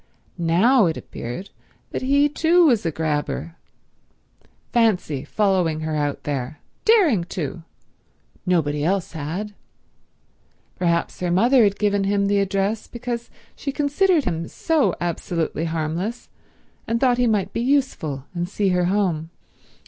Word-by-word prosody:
Now 185 +7 +4
it 160 - -2
appeared 120 +12 -7 0.4
that - - -3
he 280 +2 +3
too 335 +4 +3
was 235 - +3
a - - 0
grabber. 155 +1 -2 1.2
Fancy 190 - +1
following 180 -3 +1
her 155 0 -2
out 145 -1 -2
there—daring 170 - +1
to. 170 -1 -5 0.8
Nobody 150 -5 +1
else 185 +2 0
had. 175 +7 -5 1.2
Perhaps 170 -1 0
her 180 - -1
mother 235 +8 +4
had 200 -1 +2
given 205 -1 +1
him 200 0 +1
the 200 0 +2
address 195 +2 -1
because 235 0 -5 0.3
she 280 - -4
considered 295 +4 +2
him 165 -1 -2
so 320 -4 +1
absolutely 165 -1 -2
harmless, 165 +8 -3 0.6
and 230 +1 0
thought 250 -1 +3
he 245 - +3
might 210 -4 0
be - - -1
useful 235 - 0
and 175 0 -3
see 200 -1 0
her 180 -1 +2
home. 175 -5 0
195 Hz, 130 wpm, -22 LUFS, 165-235 Hz, 1.2 s, Now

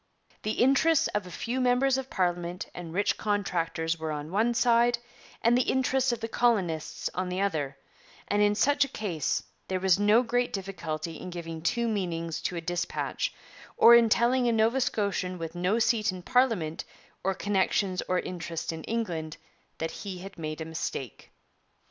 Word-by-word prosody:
'The 215 - -1
interests 275 +5 +4
of 210 -3 -2
a - - -8
few 235 +9 -3
members 255 +2 +3
of 265 0 -3
parliament 175 -1 -1
and 170 -2 -7
rich 200 +4 0
contractors 170 -5 -1
were 160 -1 -3
on 150 +1 -5
one 220 +5 +2
side, 235 0 +3 0.5
and 235 +1 +5
the 250 - +4
interests 260 0 +2
of 240 -1 -3
the 225 - -2
colonists 195 -10 0
on 185 0 -2
the 180 +1 -2
other; 155 -8 -1 0.5
and 205 0 +1
in 205 0 +4
such 285 +6 +3
a - - -2
case 180 - -2 0.2
there 185 -1 -1
was 190 0 +3
no 210 +4 +5
great 245 +1 0
difficulty 165 -5 -4
in 185 - -7
giving 165 -2 -6
two 235 +8 0
meanings 170 -6 -2
to 180 - -2
a 170 - -3
dispatch, 175 - -2 0.5
or 235 - +9
in 235 -1 +7
telling 245 +2 +3
a - - +3
Nova 225 +4 +2
Scotian 200 -5 -1
with 165 -2 -5
no 180 +5 +1
seat 225 -3 +2
in 185 -1 -8
parliament 225 -11 +1 0.4
or 195 0 0
connections 190 -1 +1
or 185 - +1
interest 170 -2 -4
in 160 -1 -7
England 170 -9 -3 0.4
that 165 0 -3
he 195 -3 -6
had 190 +2 -9
made 155 -1 -5
a - - -3
mistake. 160 -6 -5
195 Hz, 175 wpm, -28 LUFS, 170-235 Hz, 0.5 s, or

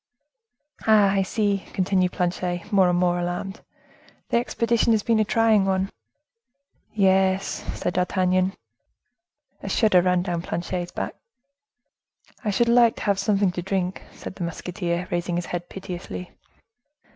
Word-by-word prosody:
"Ah, 210 -3 +6
I 195 0 +2
see," 200 0 0
continued 185 -1 +1
Planchet, 180 +1 -2
more 190 -2 +5
and 175 - +1
more 175 0 +2
alarmed, 175 +3 -4 0.7
"the - - +2
expedition 235 -1 +1
has 215 -2 +1
been 230 -2 +2
a - - +4
trying 220 -1 +3
one?" 190 0 0 1.0
"Yes," 190 -1 +2 0.2
said - - -1
D'Artagnan. 185 +1 +1 1.1
A 195 - -5
shudder 195 -3 +4
ran 180 0 +2
down 175 -2 -2
Planchet's 175 +1 -4
back. - - -4 1.3
"I 215 - -1
should 235 +4 +2
like 235 -1 +5
to - - -7
have 200 -2 +1
something 200 -3 +2
to 175 - -4
drink," 185 0 -2
said - - -9
the 185 - -6
musketeer, 175 +1 -3
raising 175 0 -1
his 175 0 -2
head 175 0 -5
piteously. 180 -1 -7
190 Hz, 140 wpm, -24 LUFS, 180-205 Hz, 1.3 s, Ah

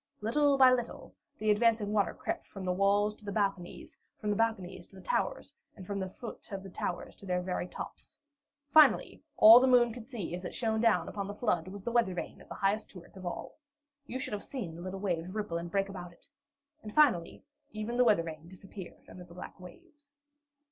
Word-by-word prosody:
Little 280 +5 +2
by 260 -1 +7
little 245 -1 -4 0.2
the 215 0 +2
advancing 215 -1 +2
water 205 -2 +1
crept - - -4
from 195 -2 -8
the 180 - +1
walls 200 +2 +2
to - - -18
the 200 - -5
balconies, 195 -4 -3 0.2
from 210 - -1
the - - +1
balconies 190 -5 -1
to - - -19
the 190 - -11
towers, - - -1 0.2
and 190 - -10
from 200 +1 -3
the 190 -1 -3
foot 230 +3 -10
of 195 -1 -5
the 195 - -10
towers 175 - -4
to 200 - -12
their 180 0 +1
very 180 -1 -2
tops. 310 - -9 0.5
Finally, 310 -1 +5 0.2
all 225 +3 +10
the 260 - +3
moon 240 -2 +5
could 235 -1 -10
see 225 -10 -5
as 180 +1 -5
it 180 - -6
shone 220 -1 0
upon 210 -3 +1
the 205 - -6
flood 180 -8 0
was 195 +1 -8
the 235 - -2
weather 230 -6 +2
vane 175 - -6
of - - -17
the - - -6
highest 200 +2 0
turret 180 -1 -14
of 185 -2 -7
all. 175 - -6 0.5
You 255 - -4
should 260 - -5
have 205 - -3
seen 220 -12 -6
the 170 - -9
little 185 +2 -5
waves 175 -3 -2
ripple 205 -6 -2
and 170 0 -6
break 195 +2 0
about 180 -3 -8
it! - - -22 0.5
And 210 -1 -9
finally, 245 - +3 0.3
even 215 +3 -4
the 250 - +6
weather 210 -8 +4
vane 160 0 -8
disappeared 190 0 -11
under 180 - -11
the 170 0 -15
black 180 - -9
waves. 290 - -15
200 Hz, 215 wpm, -31 LUFS, 180-230 Hz, 0.5 s, all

